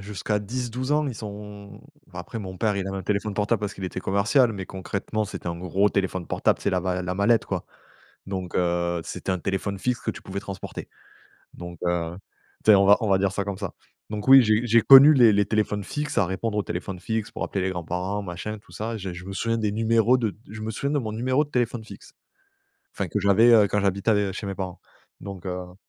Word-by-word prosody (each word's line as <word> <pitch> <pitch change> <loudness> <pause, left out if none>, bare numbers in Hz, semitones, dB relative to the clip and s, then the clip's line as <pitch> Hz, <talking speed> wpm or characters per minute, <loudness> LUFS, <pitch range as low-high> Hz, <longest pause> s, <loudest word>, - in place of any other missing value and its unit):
jusqu'à 105 +1 -2
10-12 125 +5 -3
ans, 150 0 +2
ils 130 - -3
sont 105 -1 -9 0.2
bah, 90 -1 -11
après, 115 +6 -7
mon 95 -3 -7
père 105 -1 +1
il 95 - -2
avait 95 - -4
un 95 - -4
téléphone 100 +1 -1
portable, 105 +1 0
parce 105 -1 -3
qu'il 95 - -7
était 95 - -4
commercial, 110 +6 +2
mais 95 -2 -5
concrètement 100 +3 -3
c'était 100 - -8
un 85 0 -3
gros 95 +3 +1
téléphone 95 -3 -1
portable, - - +1
tu - - -14
sais, 100 - +2
la 90 -1 +1
va 90 0 -2
la 90 +1 -3
mallette, 110 +4 +3
quoi, - - -4 0.6
donc 95 -2 -5
heu 85 -1 0
c'était 95 - -4
un 95 - -1
téléphone 95 +2 -3
fixe 125 +3 -1
que - - -2
tu - - -11
pouvais 100 +1 -6
transporter, 100 -2 -7 0.6
donc 85 -1 -9
heu, 85 -1 -1 0.5
tu - - +6
sais, 105 - +9
on 100 0 +4
va 100 - +8
on 110 - -1
va 95 - +4
dire 100 0 +1
ça 100 - -1
comme 100 -1 -5
ça, 100 -5 -5 0.3
donc 105 +3 -5
oui, 135 0 +10
j'ai 110 +2 +2
j'ai 115 -1 +4
connu 135 +5 +10
les 120 -6 +6
les 100 0 +3
téléphones 105 -1 -1
fixes, 150 +8 -4
à 100 - +3
répondre 105 +4 -3
aux 105 - +1
téléphones 90 +1 -5
fixes 110 -1 -3
pour - - -5
appeler 95 - -2
les 95 - 0
grands-parents, 90 +3 -3
machin, 100 +4 -6
tout - - -22
ça. 115 +2 -4
J'ai 95 -4 -6
je 90 - -9
me 95 - -7
souviens 115 +3 -1
des 105 -2 0
numéros 115 +2 +3
de 110 -5 -2
je 110 +2 -9
me 110 +1 -3
souviens 140 +6 -2
de 145 - +2
mon 110 - -4
numéro 130 +6 +1
de 145 - -17
téléphone 120 -2 -1
fixe, - - -13 0.8
enfin, 100 - -3
que 105 +5 -2
j'avais, 100 +4 +5
heu, 105 -3 +6
quand 105 - 0
j'habitais 100 +2 +1
av 100 -2 +1
chez 100 - -6
mes 100 - -3
parents, 95 -2 -5 0.4
donc 95 -2 -8
heu 90 0 -6
100 Hz, 240 wpm, -25 LUFS, 95-110 Hz, 0.8 s, oui